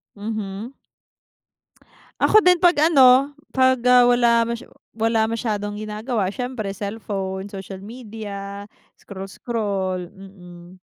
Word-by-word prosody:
Mhm. 215 Hz, +2 st, -5 dB, 1.5 s
Ako 430 Hz, -, +6 dB
din 360 Hz, -2 st, +5 dB
'pag 350 Hz, 0 st, +4 dB, 0.2 s
ano 265 Hz, -2 st, +6 dB, 0.2 s
'pag, 260 Hz, 0 st, +4 dB
ah, 250 Hz, 0 st, +7 dB
wala 240 Hz, -1 st, +4 dB
masya 235 Hz, +2 st, -5 dB, 0.3 s
wala 225 Hz, 0 st, +1 dB
masyadong 210 Hz, -3 st, -3 dB
ginagawa 215 Hz, +1 st, -3 dB
siyempre 245 Hz, -5 st, -4 dB
cellphone, 195 Hz, -2 st, -5 dB
social 195 Hz, -1 st, -8 dB
media, 205 Hz, -2 st, -8 dB, 0.3 s
scroll 195 Hz, -1 st, -9 dB
scroll, 200 Hz, -5 st, -3 dB
mm. 180 Hz, -2 st, -14 dB
215 Hz, 105 wpm, -22 LUFS, 195-240 Hz, 1.5 s, ah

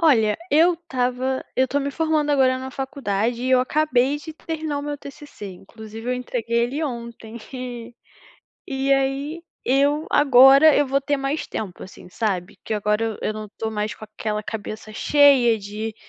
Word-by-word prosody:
Olha, 225 Hz, -10 st, +4 dB
eu 330 Hz, +4 st, +5 dB
estava 260 Hz, -5 st, -2 dB
eu 260 Hz, -, +3 dB
tô 285 Hz, +2 st, -1 dB
me 280 Hz, 0 st, -2 dB
formando 310 Hz, -1 st, 0 dB
agora 260 Hz, -2 st, +3 dB
na 260 Hz, 0 st, -6 dB
faculdade 245 Hz, -4 st, -2 dB
e 255 Hz, -, -1 dB
eu 255 Hz, -1 st, +5 dB
acabei 270 Hz, 0 st, +1 dB
de 305 Hz, +2 st, -9 dB
terminar 315 Hz, -2 st, -4 dB
o -, -, -5 dB
meu 290 Hz, 0 st, -4 dB
TCC, 285 Hz, -5 st, -10 dB
inclusive 220 Hz, +4 st, -10 dB
eu 250 Hz, -, +1 dB
entreguei 240 Hz, -2 st, -2 dB
ele 275 Hz, +6 st, -3 dB
ontem, 235 Hz, -3 st, -7 dB, 0.2 s
e 245 Hz, -2 st, -7 dB, 0.7 s
e 270 Hz, 0 st, 0 dB
aí, 275 Hz, +4 st, -2 dB, 0.2 s
eu 285 Hz, +4 st, +2 dB
agora 275 Hz, +2 st, +7 dB
eu 290 Hz, -, +3 dB
vou 275 Hz, +1 st, +1 dB
ter 285 Hz, +1 st, 0 dB
mais 275 Hz, +3 st, -2 dB
tempo, 195 Hz, -5 st, -6 dB
assim, 185 Hz, -, -12 dB
sabe, 190 Hz, -3 st, -3 dB
que -, -, -4 dB
agora 210 Hz, +1 st, 0 dB
eu 225 Hz, -2 st, -3 dB
eu -, -, -1 dB
não 215 Hz, -, -6 dB
estou 220 Hz, +2 st, -5 dB
mais 210 Hz, -1 st, -3 dB
com 215 Hz, -, -10 dB
aquela 215 Hz, 0 st, -4 dB
cabeça 215 Hz, 0 st, -6 dB
cheia 260 Hz, -2 st, +4 dB
de 210 Hz, +2 st, -6 dB
255 Hz, 175 wpm, -22 LUFS, 220-285 Hz, 0.7 s, agora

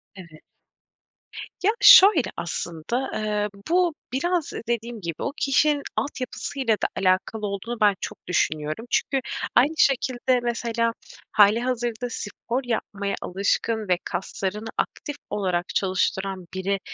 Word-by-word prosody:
Evet. 170 Hz, -5 st, -13 dB, 1.2 s
Ya, 410 Hz, -, +5 dB
şöyle, 385 Hz, -, +8 dB
aslında, 170 Hz, +8 st, -3 dB
eee, 210 Hz, -1 st, -1 dB, 0.2 s
bu 350 Hz, -1 st, +3 dB, 0.2 s
biraz 340 Hz, +4 st, 0 dB, 0.2 s
dediğim 235 Hz, -1 st, -3 dB
gibi, 170 Hz, -3 st, -4 dB
o -, -, -1 dB
kişinin 290 Hz, 0 st, +2 dB
altyapısıyla 260 Hz, -2 st, -2 dB
da -, -, +4 dB
alakalı 190 Hz, +3 st, +1 dB
olduğunu 200 Hz, +4 st, -4 dB
ben 205 Hz, -2 st, +5 dB
çok -, -, -7 dB
düşünüyorum. 155 Hz, +3 st, -1 dB
Çünkü 270 Hz, +2 st, +1 dB, 0.4 s
aynı 280 Hz, +6 st, +5 dB
şekilde 255 Hz, -2 st, +2 dB
mesela 235 Hz, -1 st, -1 dB, 0.4 s
hâlihazırda 235 Hz, +3 st, +2 dB
spor 235 Hz, +3 st, -4 dB
yapmaya 205 Hz, -4 st, -2 dB
alışkın 205 Hz, +3 st, -1 dB
ve 180 Hz, -, +4 dB
kaslarını 195 Hz, +3 st, -4 dB
aktif 290 Hz, -, -3 dB
olarak 180 Hz, -4 st, -1 dB
çalıştıran 190 Hz, 0 st, 0 dB
biri, 195 Hz, +1 st, -1 dB
225 Hz, 115 wpm, -24 LUFS, 195-255 Hz, 1.2 s, şöyle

